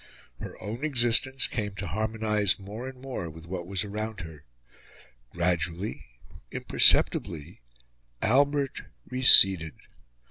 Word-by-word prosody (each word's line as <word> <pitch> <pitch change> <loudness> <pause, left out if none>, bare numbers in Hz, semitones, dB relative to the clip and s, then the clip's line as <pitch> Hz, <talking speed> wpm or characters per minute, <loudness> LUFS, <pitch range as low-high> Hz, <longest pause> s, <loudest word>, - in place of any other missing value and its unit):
Her - - -10
own 115 +7 -8
existence 130 -1 +2
came 105 -3 -5
to 100 - -7
harmonise 105 +1 -2
more 105 +6 -9
and 130 -1 -15
more 125 -10 -7
with 80 0 -14
what 90 0 -8
was 95 -1 -3
around 105 0 -7
her. 80 -4 -13 0.9
Gradually, 85 +2 -4 0.4
imperceptibly, 80 -2 +2 0.6
Albert 140 +3 -1 0.2
receded. 95 - +5
105 Hz, 105 wpm, -25 LUFS, 85-120 Hz, 0.9 s, receded